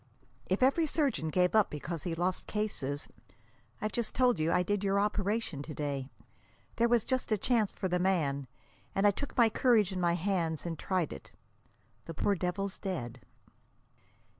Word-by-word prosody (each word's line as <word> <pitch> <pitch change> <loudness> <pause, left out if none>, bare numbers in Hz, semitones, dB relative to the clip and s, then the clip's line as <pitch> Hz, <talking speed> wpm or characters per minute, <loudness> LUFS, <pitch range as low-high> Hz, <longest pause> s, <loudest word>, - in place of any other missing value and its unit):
"If 190 +7 +1
every 310 +5 +4
surgeon 280 - 0
gave 180 +2 +2
up 215 -2 +4
because 150 +2 -5
he 170 -3 -3
lost 180 +2 -1
cases 145 -10 -3 0.7
I've 215 - -2
just 235 -2 -2
told 245 -7 +3
you 155 +2 +1
I 180 - +3
did 205 +2 -1
your 200 0 +2
operation 205 -5 -1
to 150 +1 -7
day. 140 -3 -3 0.7
There 235 0 +3
was 235 -3 +3
just 260 -3 -1
a 215 - +3
chance 220 -1 +1
for 190 - -3
the 180 0 0
man, 150 -8 +1 0.5
and 195 - +2
I 205 - +7
took 285 +8 -6
my 235 -2 +7
courage 220 -3 +3
in 185 -1 -3
my 170 -1 +3
hands 170 -3 -1
and 165 -2 -4
tried 185 -5 -1
it. 70 - -11 0.7
The 165 - -7
poor 200 - +2
devil's 195 +2 -2
dead." 130 - -4
190 Hz, 175 wpm, -31 LUFS, 165-215 Hz, 0.7 s, I